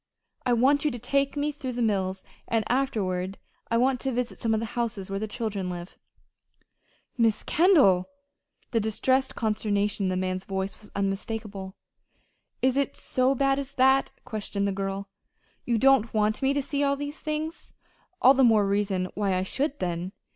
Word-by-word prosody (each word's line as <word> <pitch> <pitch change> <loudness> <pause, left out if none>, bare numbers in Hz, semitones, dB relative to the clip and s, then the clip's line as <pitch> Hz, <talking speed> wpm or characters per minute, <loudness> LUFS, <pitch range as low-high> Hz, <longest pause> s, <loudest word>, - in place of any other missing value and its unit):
I 245 - +4
want 270 +5 +3
you 300 - +3
to 245 - -4
take 275 +4 0
me 290 +1 0
through 265 -3 -5
the 240 - -3
mills, 190 -3 0 0.2
and 225 -1 +1
afterward 195 -8 -1 0.3
I 230 - +2
want 255 +1 +2
to 270 - -1
visit 250 0 -3
some 230 - 0
of 220 - +2
the 230 - -2
houses 220 -5 -3
where 195 - -1
the 215 - -3
children 205 -4 -3
live." 175 0 -7 1.2
"Miss 225 -2 +2
Kendall!" 285 - +4 0.6
The 230 - +2
distressed 260 +5 +1
consternation 210 -2 0
in - - +1
the 185 - -1
man's 185 0 -2
voice 195 +1 -4
was 210 - -13
unmistakable. 200 0 -3 0.9
"Is 260 +1 +3
it 280 - 0
so 255 +1 +1
bad 275 +1 +2
as 280 0 -6
that?" 265 +1 +4
questioned 205 -2 -2
the - - 0
girl. 195 0 -3 0.6
"You 235 -2 +1
don't 265 -2 +4
want 215 +2 +1
me 270 +1 +2
to 285 - 0
see 285 +1 -2
all 280 0 +2
these 290 +2 -6
things? 310 +1 -4 0.5
All 260 - +9
the 270 0 +3
more 220 -4 +5
reason 195 -2 0
why 200 -2 0
I 185 - 0
should, 275 +8 -2
then! 175 +1 -3
225 Hz, 175 wpm, -27 LUFS, 195-270 Hz, 1.2 s, All